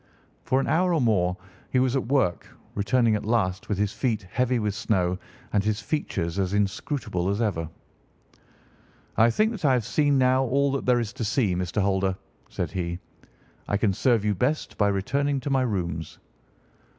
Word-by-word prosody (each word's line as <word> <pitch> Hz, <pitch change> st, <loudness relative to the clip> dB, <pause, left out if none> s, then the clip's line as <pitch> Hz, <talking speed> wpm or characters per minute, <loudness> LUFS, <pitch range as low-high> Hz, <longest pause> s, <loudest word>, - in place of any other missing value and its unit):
For 130 Hz, -, +2 dB
an -, -, 0 dB
hour 175 Hz, +2 st, +2 dB
or -, -, +2 dB
more 95 Hz, -7 st, +2 dB, 0.3 s
he -, -, 0 dB
was 130 Hz, 0 st, +2 dB
at 130 Hz, -, -1 dB
work, 130 Hz, -10 st, +1 dB, 0.3 s
returning 115 Hz, +2 st, +2 dB
at 105 Hz, -, -1 dB
last 105 Hz, -4 st, 0 dB
with 105 Hz, -, 0 dB
his 105 Hz, 0 st, 0 dB
feet 115 Hz, -6 st, -1 dB
heavy 125 Hz, +1 st, +1 dB
with 105 Hz, -3 st, -1 dB
snow 95 Hz, -4 st, 0 dB, 0.3 s
and 100 Hz, -1 st, +2 dB
his 105 Hz, 0 st, 0 dB
features 100 Hz, -, -2 dB
as 95 Hz, +1 st, 0 dB
inscrutable 100 Hz, -, -1 dB
as 100 Hz, +2 st, -1 dB
ever. 85 Hz, -8 st, -1 dB, 1.5 s
"I 115 Hz, +2 st, +5 dB
think 215 Hz, -, +2 dB
that 210 Hz, -6 st, -7 dB
I 135 Hz, -3 st, +4 dB
have 120 Hz, -4 st, +1 dB
seen 145 Hz, +2 st, +2 dB
now 130 Hz, 0 st, +3 dB
all 140 Hz, +3 st, +2 dB
that 135 Hz, -1 st, -3 dB
there 125 Hz, -1 st, +4 dB
is 115 Hz, -3 st, -3 dB
to -, -, -4 dB
see, 110 Hz, -3 st, +1 dB
Mr. 90 Hz, +3 st, -1 dB
Holder," 95 Hz, -1 st, +1 dB, 0.3 s
said -, -, -3 dB
he; 85 Hz, -2 st, -3 dB, 0.7 s
"I 100 Hz, -, +1 dB
can 100 Hz, -2 st, +1 dB
serve 115 Hz, +1 st, +2 dB
you 105 Hz, -, +2 dB
best 130 Hz, -, -1 dB
by 105 Hz, -, +2 dB
returning 135 Hz, +8 st, 0 dB
to 140 Hz, -, -3 dB
my 135 Hz, -1 st, +3 dB
rooms." 85 Hz, -, -3 dB
110 Hz, 185 wpm, -25 LUFS, 95-130 Hz, 1.5 s, I